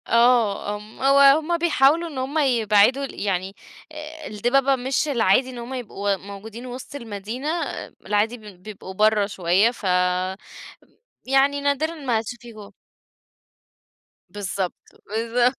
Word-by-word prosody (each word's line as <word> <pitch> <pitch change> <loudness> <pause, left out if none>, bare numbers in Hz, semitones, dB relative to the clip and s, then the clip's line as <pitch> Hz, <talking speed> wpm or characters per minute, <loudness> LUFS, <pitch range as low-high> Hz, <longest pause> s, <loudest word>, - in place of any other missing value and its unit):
آه 230 -4 +3
ام 210 +1 -12
هو 275 +1 +5 0.2
هُم 330 +2 -1
بيحاولوا 330 0 +3
إن 290 - -9
هُم 265 +4 -3
يبعدوا 240 -1 +3
ال - - -10
يعني 195 -1 -2 0.4
آآ، 310 0 -9
الدِبَبة 255 +6 +2
مش 265 +4 -1
العادي 250 -1 +2
إن 250 - -9
هُم 240 +2 -7
يبقوا 205 -5 -2
موجودين 200 +5 -10
وسط 255 +3 -8
المدينة، 230 +2 -6 0.6
العادي 210 +4 0
بيد 205 -5 -14
بيبقوا 200 -2 -9
برّه 215 +1 +3
شويّة 195 +2 +2
ف 245 - -15 1.4
يعني 275 +2 +2
نادرًا 285 +3 0
ما 265 -7 -1
هاتشوفيهم. 225 -2 -8 1.6
بالضبط، 195 -2 -3 0.4
بالضبط، 240 +3 +1
235 Hz, 125 wpm, -23 LUFS, 205-270 Hz, 1.6 s, هو